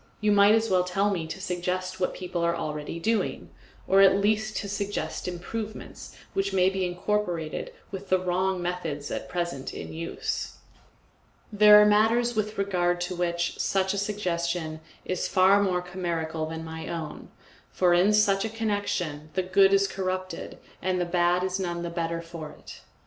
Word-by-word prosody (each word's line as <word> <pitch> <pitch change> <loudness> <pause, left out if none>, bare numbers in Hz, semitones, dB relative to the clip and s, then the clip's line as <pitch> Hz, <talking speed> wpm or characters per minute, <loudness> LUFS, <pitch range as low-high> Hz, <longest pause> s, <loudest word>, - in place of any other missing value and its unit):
You 215 -1 +2
might 205 +1 +6
as 225 0 +1
well 185 -3 +3
tell 195 +3 +1
me 170 -5 -2
to 175 - -6
suggest 185 0 -3
what 180 - -1
people 180 -2 -4
are 170 0 +2
doing 170 - -4
already, 165 +8 -2 0.4
or 195 +1 +5
at 195 0 +6
least 215 +1 +1
to 200 - -3
suggest 200 -1 -3
improvements 210 +5 -6 0.2
which 195 0 -1
may 185 0 +4
be 190 -1 -1
incorporated 175 -3 -2 0.2
with 195 0 -7
the 185 - +4
wrong 185 0 0
methods 165 -5 -3
at - - -4
present 170 -7 -3
in - - -7
use. 165 +1 -4 1.0
There 210 0 +8
are 210 - +7
matters 225 +3 +3
with 215 0 -2
regard 175 -3 +1
to 180 +1 -2
which 170 0 -1
such 190 0 +1
a - - -3
suggestion 170 -5 -2 0.3
is 185 - -1
far 195 +1 +5
more 180 -3 0
chimerical 165 -3 -3
than 160 0 -6
my 160 0 -7
own, 160 -3 -6 0.4
for 180 -2 +3
in 180 +4 +4
such 205 -2 +3
a 225 - -2
connection 205 -9 -2
the 185 - +1
good 195 +1 +4
is 195 0 +4
corrupted 185 -1 -4 0.2
and 185 -1 0
the 175 - +1
bad 175 +1 +2
is 185 +1 -1
none 175 -2 -3
the 170 - -4
better 170 -1 -2
for 165 -2 -8
it. - - -12
185 Hz, 170 wpm, -27 LUFS, 170-200 Hz, 1.0 s, There